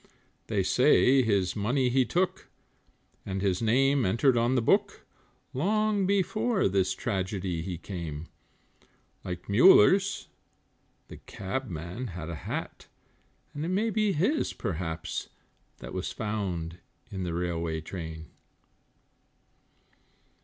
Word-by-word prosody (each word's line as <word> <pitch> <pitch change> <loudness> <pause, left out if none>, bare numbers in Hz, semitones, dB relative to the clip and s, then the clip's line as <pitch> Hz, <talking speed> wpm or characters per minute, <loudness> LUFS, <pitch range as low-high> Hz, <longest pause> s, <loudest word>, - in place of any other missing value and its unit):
They 100 -4 0
say 130 +5 +4
his 100 -6 +1
money 125 +5 +1
he 130 +1 +3
took, 180 +6 -1 0.7
and 95 0 -3
his 95 -1 0
name 135 +4 +3
entered 115 +7 +3
on 120 +2 +2
the 125 - +3
book, - - +1 0.5
Long 205 +6 +1
before 200 +3 +1
this 95 -1 +1
tragedy 95 -4 -2
he 90 +1 -4
came; 85 -4 -6 1.0
Like 90 -1 -6
Muller's, 190 - +5 0.8
the - - -10
Cabman 95 0 -5
had 85 0 -5
a - - -4
hat, - - -5 0.7
and 145 - -4
it - - -2
may 210 +5 +1
be 215 -1 +1
his, 205 - +1
perhaps 80 -2 -4 0.5
That - - -9
was - - -3
found 90 -6 -3 0.3
in 95 -2 -4
the 85 -2 -3
railway 85 -2 -2
train. 80 -1 -7
105 Hz, 115 wpm, -28 LUFS, 90-145 Hz, 1.0 s, Muller's